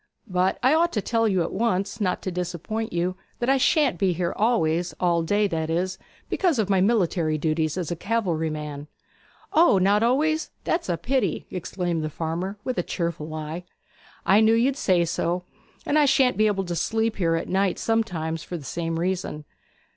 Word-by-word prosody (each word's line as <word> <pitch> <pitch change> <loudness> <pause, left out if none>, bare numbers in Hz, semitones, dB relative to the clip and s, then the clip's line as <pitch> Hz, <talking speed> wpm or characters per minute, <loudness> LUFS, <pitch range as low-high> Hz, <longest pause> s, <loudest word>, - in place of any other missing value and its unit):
But 185 -2 +1
I 260 +3 +5
ought 340 +2 +3
to 210 - 0
tell 230 -1 +1
you 190 -4 +2
at - - -4
once, 205 -1 -1
not 185 -3 0
to 185 - -2
disappoint 180 +5 -3
you, 175 +2 -1 0.2
that 245 +2 +1
I 270 - +4
shan't 270 - +2
be 190 -2 +2
here 175 +1 -1
always 175 -7 +1
all 170 -2 +2
day, 205 +6 +1
that 160 -2 -2
is, 185 +3 -1 0.3
because 350 -7 +1
of 205 -3 0
my 190 -1 +3
military 180 -7 +2
duties 155 +1 0
as 175 -3 -3
a - - -1
cavalry 175 -5 -1
man.' 150 -1 -6 0.7
'O, 320 - +5
not 200 +3 +3
always? 305 +7 +1
That's 335 - -1
a 175 - +1
pity!' 265 +5 -1
exclaimed 175 -2 -2
the 155 - -2
farmer 170 +6 -3
with 255 -1 -2
a - - +3
cheerful 170 -3 -3
eye. 155 +3 -5 0.6
'I 195 +3 +5
knew 220 +1 +5
you'd 255 +4 +2
say 180 -9 +2
so. 175 +2 -1 0.4
And 305 - +3
I 295 - +5
shan't 265 -2 +3
be 215 0 +3
able 195 -2 0
to 175 -1 -3
sleep 225 +5 0
here 165 -4 +2
at 165 - -2
night 190 0 +1
sometimes, 170 -8 -1
for 175 - -6
the 155 - -10
same 165 +1 -3
reason.' 175 -4 -2
185 Hz, 190 wpm, -25 LUFS, 165-225 Hz, 0.7 s, I